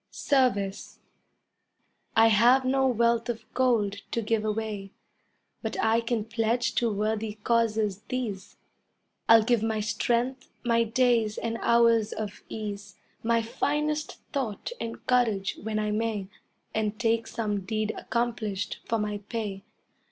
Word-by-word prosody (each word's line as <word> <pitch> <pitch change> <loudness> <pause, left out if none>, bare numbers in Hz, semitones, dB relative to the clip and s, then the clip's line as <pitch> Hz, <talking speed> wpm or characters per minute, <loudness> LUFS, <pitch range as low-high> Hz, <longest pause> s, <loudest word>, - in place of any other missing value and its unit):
SERVICE 235 -9 0 1.2
I 225 0 +7
have 240 +5 +5
no 265 +1 +3
wealth 235 -1 +2
of 230 -1 -4
gold 225 -6 +2
to 230 - -1
give 215 0 0
away, 215 -2 -3 0.7
But - - -4
I 225 +1 +3
can 230 -2 -1
pledge 230 +1 0
to 235 -2 +2
worthy 215 +1 -1
causes 220 -4 +1
these: 225 -7 -4 0.7
I'll 225 -1 +8
give 235 -1 +2
my 220 -1 0
strength, 240 +4 -1 0.2
my 230 -1 +3
days 230 -2 +2
and 230 0 -3
hours 230 -2 +4
of 210 -1 -5
ease, 205 -3 -6 0.3
My 230 0 +2
finest 300 +5 -1 0.2
thought 255 - -3
and 230 0 -6
courage 225 -6 +1
when 215 0 -2
I 210 0 0
may, 210 -3 -1 0.4
And 215 -1 -1
take 230 -1 +1
some 210 -3 -2
deed 215 +2 -1
accomplished 225 -5 -2
for 230 - +1
my 210 -1 -2
pay. 210 -4 -3
225 Hz, 130 wpm, -27 LUFS, 210-235 Hz, 1.2 s, I'll